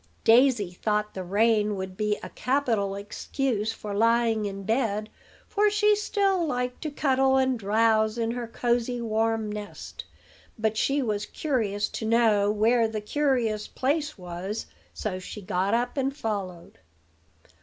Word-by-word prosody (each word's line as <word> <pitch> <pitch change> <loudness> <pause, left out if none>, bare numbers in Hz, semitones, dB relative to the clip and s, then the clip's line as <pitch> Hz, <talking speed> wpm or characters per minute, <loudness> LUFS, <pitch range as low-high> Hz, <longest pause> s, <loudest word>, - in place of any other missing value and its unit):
Daisy 235 -5 +4
thought 210 +3 -1
the 190 - -5
rain 210 +2 +2
would 190 -1 -5
be 210 +1 0
a - - -6
capital 235 -8 0
excuse 215 +2 -2
for 210 -2 -6
lying 230 0 +2
in 195 -1 -5
bed; 215 -1 -1 0.4
for 420 0 +2
she 420 0 +3
still 395 -3 +1
liked 250 -4 -2
to 310 - -2
cuddle 265 -2 +2
and 260 -2 +1
drowse 220 +1 +2
in 230 -1 0
her 240 -1 -4
cosey, 240 +1 0
warm 225 -1 0
nest. 210 -1 -7 0.5
But 220 0 0
she 275 +5 +1
was 210 -3 -2
curious 215 -9 -1
to 220 - -5
know 220 -3 +3
where 225 +2 +3
the 220 -1 -3
curious 230 -3 0
place 295 +2 -1
was; 180 +4 -5 0.3
so 185 -4 -4
she 185 - -8
got 190 +2 0
up 240 +1 -1
and 270 +1 -1
followed. 195 - -5
225 Hz, 145 wpm, -26 LUFS, 210-255 Hz, 0.5 s, Daisy